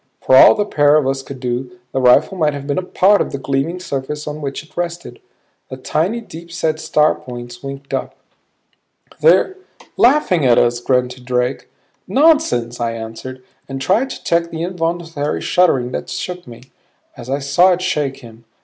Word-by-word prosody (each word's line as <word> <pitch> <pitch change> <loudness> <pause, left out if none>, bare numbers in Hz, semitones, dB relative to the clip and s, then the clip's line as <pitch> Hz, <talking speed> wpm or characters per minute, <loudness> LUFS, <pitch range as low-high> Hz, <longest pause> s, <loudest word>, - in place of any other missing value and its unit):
For 130 - +3
all - - +8
the 205 - 0
pair 145 -6 +3
of 155 -3 +3
us 135 0 -1
could 135 0 -10
do, 125 0 -4
the 135 - -1
rifle 130 +9 +4
might 155 -5 +1
have 140 -1 -7
been 140 +4 -1
a - - -2
part 190 +2 +3
of - - -2
the - - -3
gleaming 140 +6 -2
surface 150 -3 -5
on 150 +1 -5
which 140 +1 -5
it 155 - -23
rested. 175 0 -5 0.5
The 130 - -7
tiny, 175 - -1
deepset 165 -5 -4
star 155 -1 +2
points 120 -1 -9
winked 140 0 -8
up - - -3 1.0
"They're 390 -5 +4 0.4
laughing 240 - +3
at 125 -3 +4
us!" 120 0 +2
grunted 125 0 -1
Drake. 125 +1 -1 0.4
"Nonsense," 280 - +2
I 115 -1 -1
answered, 115 +3 -8 0.3
and 135 0 -5
tried 205 - +1
to - - -8
check 170 0 +1
the 165 0 -5
involuntary 165 -4 -2
shuddering 135 -9 +2
that - - -5
shook 180 -3 -5
me, 120 0 -12 0.5
as 120 - -10
I 135 - 0
saw 145 +7 +3
it 180 +1 -3
shake 150 -7 -2
him. 115 -1 -14
145 Hz, 175 wpm, -18 LUFS, 130-175 Hz, 1.0 s, all